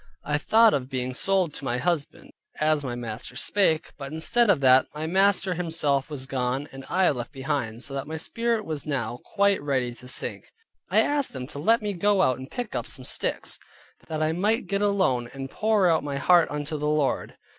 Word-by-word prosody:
I 145 0 0
thought 225 +6 +5
of 130 -2 -1
being 130 -1 -2
sold 185 +2 +1
to - - -8
my 125 -2 -1
husband, 160 +1 -2 0.3
as 155 -1 +2
my 125 -3 -3
master 120 0 -6
spake, 165 +1 +1
but 140 0 -6
instead 205 +9 +2
of 185 -7 +5
that, 130 0 +6
my 155 +1 -3
master 190 +2 +2
himself 160 -5 -1
was 140 -4 -5
gone, 130 +1 -2
and 135 0 -9
I 185 -1 +3
left 125 -4 -5
behind, 130 -4 -3
so 140 - -7
that 135 0 -4
my 160 +1 -4
spirit 230 +5 -1
was 155 -2 -5
now 125 -4 -2
quite 200 -1 +2
ready 130 -4 -1
to 125 +1 -14
sink. 130 - -5 0.4
I - - +5
asked 290 -2 0
them 130 -2 -5
to 145 +1 -9
let 225 +8 +3
me 205 -1 -1
go 195 +1 +2
out 130 -4 +2
and 130 - -9
pick 245 -3 -5
up - - -3
some - - -6
sticks, - - -1 0.5
that 155 -1 -2
I 155 - +1
might 210 +8 +1
get 200 0 -1
alone, 185 -13 +1
and 135 0 -6
pour 215 -3 +2
out 160 -3 +3
my 140 -1 -3
heart 175 +3 +4
unto 150 +1 -4
the 150 +1 0
Lord. 150 -3 0
150 Hz, 210 wpm, -26 LUFS, 135-190 Hz, 0.5 s, that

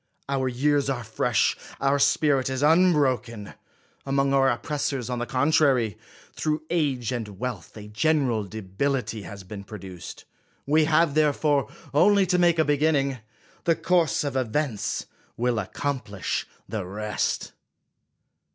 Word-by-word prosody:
Our 135 -1 0
years 140 +3 +1
are 125 -3 -2
fresh, 110 0 +1 0.2
our 140 +1 +2
spirit 135 -2 +3
is 130 +1 -2
unbroken; 140 - +2 0.5
among 135 0 +1
our 135 -1 +4
oppressors, 130 0 -2
on 125 - -2
the 120 - -3
(jontrary, 130 - +2 0.4
through 155 0 -2
age 135 -9 0
and 110 -5 -5
wealth, 115 -6 -5
a 105 -1 -9
general 125 -1 +1
de 110 +2 -8
bility 110 +2 -2
has 100 -1 -9
been 100 +1 -8
produced. 95 -4 -9 0.4
We 155 +2 +3
have 155 -1 +3
therefore 150 -1 +2 0.2
only 200 +6 +5
to 180 0 +1
make 170 -1 +4
a 160 - +3
beginning; 145 -3 +1 0.5
the 165 - +4
course 170 -5 +1
of 140 -2 -3
events 120 -3 -1 0.3
will 120 -1 +1
accomplish 105 -2 -3 0.2
the 110 -3 -3
rest. 105 +3 -2
135 Hz, 135 wpm, -25 LUFS, 110-150 Hz, 0.5 s, only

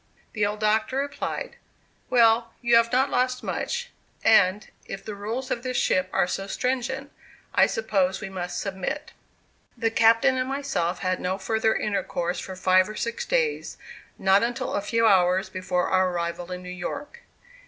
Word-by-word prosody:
The 210 -2 +1
old 210 +1 -4
Doctor 220 +4 +1
replied: 285 - -3 0.5
"Well, 230 -1 +4
you 240 -1 +3
have 230 0 +4
not 265 +2 +2
lost 255 0 0
much; 485 0 -3 0.3
and, 205 -2 +4 0.2
if 195 - -7
the 215 - -5
rules 225 +6 -4
of 235 - -1
this 255 0 -3
ship 185 0 +1
are - - +2
so 195 +2 -4
stringent, 260 +5 -2 0.4
I - - +5
suppose 285 - 0
we 215 - -5
must 180 -2 -5
submit." 200 +11 -4 0.7
The 225 -1 0
captain 230 +4 +4
and 255 0 -1
myself 230 -12 -2
had 185 -1 0
no 185 +1 -2
further 220 +2 +1
intercourse 185 -4 -2
for 190 - -7
five 185 +1 +3
or 215 - -7
six 475 - -3
days; 480 -3 0 0.4
not 190 +1 +4
until 235 +1 -2
a 200 - 0
few 230 +3 +1
hours 185 -2 +4
before 185 -1 -1
our 185 0 +3
arrival 175 0 -3
in 180 0 -5
New 180 - -8
York. 280 - -6
220 Hz, 165 wpm, -25 LUFS, 185-255 Hz, 0.7 s, I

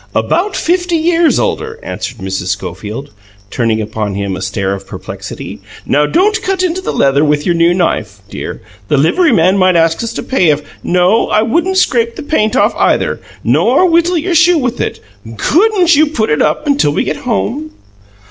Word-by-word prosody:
"About 380 +3 0
fifty 355 0 0
years 330 0 +2
older," 450 +1 -2
answered 125 - -5
Mrs. 95 -2 -4
Schofield, 105 - -5 0.4
turning 115 -2 0
upon 105 -2 -3
him 100 -1 -3
a 95 - -7
stare 95 0 -2
of 100 0 -8
perplexity. - - -8 0.3
"Don't 360 - +2
cut 380 -1 -1
into 365 +1 -1
the - - -3
leather 140 +1 +2
with 150 -1 +1
your 175 - +2
new 170 0 +3
knife, 175 -1 -1
dear; - - -7 0.2
the 145 - +1
livery 310 - +3
man 190 -2 +3
might 185 -1 +3
ask 165 +4 +2
us 230 - -3
to - - -5
pay 185 -11 +1
if 150 0 +1 0.2
No. 180 +5 +2
I 215 +1 +2
wouldn't 345 +11 0
scrape 235 -9 +1
the - - -7
paint 250 -7 0
off, - - +3
either - - +1 0.2
nor 370 - +3
whittle 340 +1 +2
your 345 +3 -1
shoe 340 +1 +4
with 250 -4 -2
it. - - -3 0.4
COULDN'T 365 -2 +3
you 305 +2 +4
put 225 - -1
it 150 - +1
up 300 - 0
until 280 - +2
we - - 0
get - - -3
home?" 280 +3 -2
225 Hz, 185 wpm, -13 LUFS, -, 0.4 s, shoe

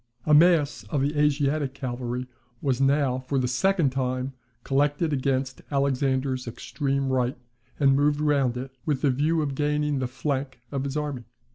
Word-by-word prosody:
A 155 - +3
mass 155 -2 +4
of 145 -4 -1
the 145 +2 0
Asiatic 145 -1 +1
cavalry 125 -1 -4 0.3
was 135 -2 0
now, 135 -2 +2
for 130 +2 -2
the 130 -1 +1
second 155 +4 +2
time, 130 0 -2 0.3
collected 145 +3 +1
against 135 -1 -1
Alexander's 135 -2 0
extreme 140 +3 -2
right, 125 -1 0 0.4
and 135 -2 +5
moved 145 +1 +2
round 140 -5 +2
it, 130 +2 -6
with 145 -4 -1
the 140 - +4
view 155 +5 +1
of 140 -2 -2
gaining 150 0 0
the 130 - -1
flank 135 0 -3
of 140 -1 -2
his 140 +2 -3
army. 145 -5 -3
140 Hz, 160 wpm, -26 LUFS, 130-145 Hz, 0.4 s, and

